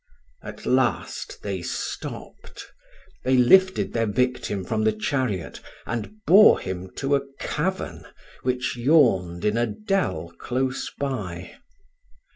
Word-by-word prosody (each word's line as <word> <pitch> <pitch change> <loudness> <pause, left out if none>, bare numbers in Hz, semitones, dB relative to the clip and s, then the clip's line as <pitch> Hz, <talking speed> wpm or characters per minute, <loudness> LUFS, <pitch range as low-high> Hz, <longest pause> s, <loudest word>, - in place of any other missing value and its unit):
At - - -9
last - - -1
they - - -3
stopped - - -6 0.6
they 130 0 +3
lifted 190 +10 +4
their 115 -1 +1
victim 105 -4 -1
from 110 +2 -1
the 110 - +4
chariot, 105 - -2 0.3
and 200 - -5
bore 205 +5 +7
him 95 0 -5
to 140 +1 +1
a 140 0 -1
cavern, 190 +5 -3 0.3
which 125 0 -1
yawned 115 - +3
in 105 +2 +2
a 120 0 +2
dell 195 - -2
close 130 +1 -2
by. 100 -11 -4
125 Hz, 115 wpm, -24 LUFS, 105-140 Hz, 0.6 s, bore